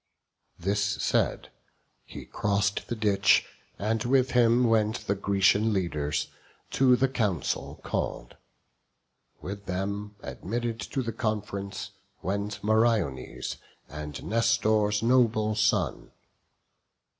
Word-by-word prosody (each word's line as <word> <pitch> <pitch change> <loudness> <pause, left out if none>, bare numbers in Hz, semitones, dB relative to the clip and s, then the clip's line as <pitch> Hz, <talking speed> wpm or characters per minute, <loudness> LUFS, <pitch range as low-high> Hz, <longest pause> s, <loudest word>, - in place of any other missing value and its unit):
This 100 +4 0
said, 100 -1 0 0.6
he - - -9
cross'd 105 0 -1
the 120 - -1
ditch, 105 -3 +3 0.3
and 110 +2 -1
with 130 +1 +2
him 120 0 +4
went 110 -1 +1
The 100 - +1
Grecian 100 +2 +2
leaders, 75 -6 -1 0.4
to 130 -2 +5
the 130 +2 +2
council 105 - -2
call'd: - - -3 1.1
With 100 +2 -7
them, 100 +3 -3
admitted 115 +2 -4
to 130 +5 -3
the 115 -1 -4
conf'rence, 100 -3 -3 0.3
went 100 +2 -3
Meriones, 110 - 0 0.3
and 75 0 -7
Nestor's 110 -2 +2
noble 115 -3 +3
son. 105 0 0
105 Hz, 100 wpm, -27 LUFS, 100-115 Hz, 1.1 s, to